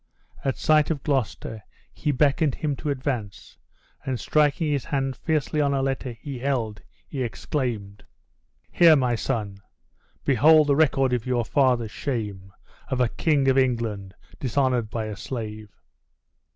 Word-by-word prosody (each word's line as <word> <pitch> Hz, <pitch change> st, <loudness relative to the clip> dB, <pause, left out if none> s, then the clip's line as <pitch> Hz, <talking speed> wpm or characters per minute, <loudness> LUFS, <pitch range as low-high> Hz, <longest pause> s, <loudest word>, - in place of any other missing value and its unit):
At 135 Hz, -2 st, -1 dB
sight 155 Hz, -1 st, +3 dB
of 150 Hz, -4 st, -2 dB
Gloucester 130 Hz, -5 st, -2 dB, 0.3 s
he 150 Hz, -, -1 dB
beckoned 145 Hz, +1 st, +2 dB
him 150 Hz, -3 st, -2 dB
to 150 Hz, -, -4 dB
advance, 130 Hz, -8 st, -4 dB, 0.4 s
and 130 Hz, -3 st, -2 dB
striking 150 Hz, +1 st, +2 dB
his 140 Hz, -3 st, -1 dB
hand 135 Hz, -2 st, -1 dB
fiercely 155 Hz, 0 st, -1 dB
on 140 Hz, -1 st, +1 dB
a 135 Hz, -, 0 dB
letter 135 Hz, -2 st, -2 dB
he 130 Hz, +3 st, -7 dB
held, 120 Hz, -6 st, -2 dB, 0.3 s
he 140 Hz, -, -5 dB
exclaimed: 115 Hz, -5 st, -3 dB, 0.7 s
"Here, 165 Hz, -2 st, +7 dB
my 125 Hz, -4 st, +1 dB
son, 105 Hz, -3 st, -3 dB, 0.6 s
behold 150 Hz, +4 st, +6 dB
the 145 Hz, -1 st, +3 dB
record 135 Hz, -4 st, +3 dB
of 125 Hz, 0 st, -1 dB
your 120 Hz, -2 st, 0 dB
father's 125 Hz, -4 st, +2 dB
shame! 105 Hz, -9 st, -4 dB, 0.4 s
of 130 Hz, -1 st, -2 dB
a 125 Hz, -2 st, +3 dB
King 145 Hz, -2 st, +1 dB
of 135 Hz, 0 st, +4 dB
England 115 Hz, -7 st, -1 dB, 0.2 s
dishonored 125 Hz, -3 st, 0 dB
by 110 Hz, 0 st, -3 dB
a 105 Hz, -1 st, -5 dB
slave!" 110 Hz, -3 st, -6 dB
130 Hz, 145 wpm, -25 LUFS, 115-140 Hz, 0.7 s, Here